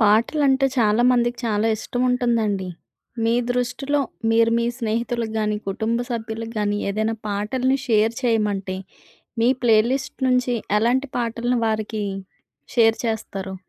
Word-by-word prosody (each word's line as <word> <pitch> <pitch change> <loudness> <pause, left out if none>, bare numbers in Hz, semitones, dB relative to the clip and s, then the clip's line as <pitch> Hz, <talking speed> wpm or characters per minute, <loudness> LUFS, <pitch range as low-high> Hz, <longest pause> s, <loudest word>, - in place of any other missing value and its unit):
పాటలంటే 265 +6 +3
చాలా 220 -1 +3
మందికి 240 -1 +1
చాలా 215 0 +1
ఇష్టం 245 +3 -4
ఉంటుందండి. 225 -6 0 0.6
మీ 230 +1 +3 0.2
దృష్టిలో, 265 +4 0 0.3
మీరు 230 0 +4
మీ 235 - 0
స్నేహితులకి 230 0 -2
గాని, 210 -1 0
కుటుంబ 220 +4 -1
సభ్యులకు 225 0 -4
గాని 205 0 0
ఏదైనా 220 +2 -1
పాటల్ని 250 +7 0
షేర్ 225 -1 +3
చేయమంటే, 210 -5 0 0.7
మీ 235 - +4
ప్లే 230 -3 +5
లిస్ట్ 265 0 -3
నుంచి 250 -1 +2 0.2
ఎలాంటి 255 +5 +1
పాటలను 240 +1 -1
వారికి 215 0 -2 0.7
షేర్ 225 -2 +4
చేస్తారు? 195 -4 -4
230 Hz, 125 wpm, -22 LUFS, 215-245 Hz, 0.7 s, ప్లే